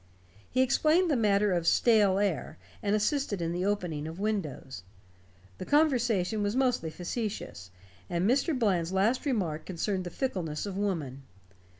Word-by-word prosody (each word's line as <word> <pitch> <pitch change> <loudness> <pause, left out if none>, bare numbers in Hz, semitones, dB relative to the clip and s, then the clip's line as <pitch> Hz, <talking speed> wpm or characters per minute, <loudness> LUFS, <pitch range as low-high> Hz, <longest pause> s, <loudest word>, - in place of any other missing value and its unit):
He 255 +1 +3
explained 310 +7 +3
the - - +3
matter 205 -3 +2
of 170 -1 -1
"stale 210 -4 +4
air", 165 -6 -1 0.2
and 205 0 +1
assisted 215 -1 0
in 165 -1 -2
the 175 +1 -2
opening 170 -7 -2
of 165 +3 -8
windows. 170 - -3 0.8
The - - -5
conversation 240 - +2
was 205 +2 -1
mostly 250 -11 +1
facetious, 175 - -5 0.4
and 175 +2 0
Mr. 275 +5 +2
Bland's 185 -8 +1
last 220 +9 +1
remark 180 - -1
concerned 185 +1 -2
the - - -4
fickleness 180 - -3
of 200 -2 -5
woman. 165 -10 -2
200 Hz, 150 wpm, -29 LUFS, 170-235 Hz, 0.8 s, stale